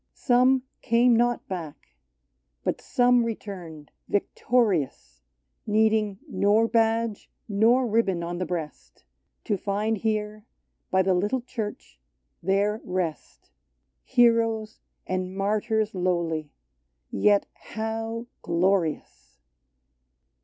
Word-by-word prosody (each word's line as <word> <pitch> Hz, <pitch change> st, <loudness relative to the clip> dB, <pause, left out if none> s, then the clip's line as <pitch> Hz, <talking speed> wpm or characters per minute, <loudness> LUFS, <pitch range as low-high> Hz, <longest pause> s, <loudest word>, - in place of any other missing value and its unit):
Some 255 Hz, +1 st, +3 dB, 0.2 s
came 235 Hz, 0 st, +4 dB
not 240 Hz, +1 st, +1 dB
back; 170 Hz, -6 st, -7 dB, 0.7 s
but -, -, -2 dB
some 245 Hz, -1 st, +3 dB
returned, 180 Hz, -9 st, -7 dB, 0.2 s
victo 205 Hz, -, -2 dB, 0.2 s
rious, 130 Hz, -, -3 dB, 0.2 s
— 60 Hz, -1 st, -49 dB
Needing 215 Hz, -1 st, +2 dB
nor 215 Hz, +3 st, +3 dB
badge 225 Hz, -1 st, 0 dB, 0.2 s
nor 225 Hz, +5 st, +3 dB
ribbon 205 Hz, -6 st, +1 dB
on 175 Hz, +1 st, -4 dB
the 185 Hz, -, -1 dB
breast, 165 Hz, -4 st, -6 dB, 0.2 s
— 65 Hz, -, -51 dB
To 205 Hz, -, 0 dB
find 210 Hz, +2 st, -1 dB
here, 215 Hz, -1 st, -2 dB, 0.5 s
by 190 Hz, 0 st, +3 dB
the 190 Hz, 0 st, +2 dB
little 205 Hz, +8 st, 0 dB
Church, 220 Hz, -, -6 dB, 0.4 s
their 200 Hz, +4 st, +1 dB
rest: 165 Hz, -, -4 dB, 0.5 s
Heroes 225 Hz, -, +2 dB, 0.3 s
and 185 Hz, 0 st, -3 dB
martyrs 215 Hz, +2 st, 0 dB
lowly 170 Hz, -4 st, -1 dB, 0.4 s
— -, -, -52 dB, 0.2 s
yet 205 Hz, -1 st, +3 dB
how 225 Hz, +1 st, -5 dB, 0.2 s
glorious 170 Hz, -, -1 dB
210 Hz, 105 wpm, -26 LUFS, 180-225 Hz, 0.7 s, came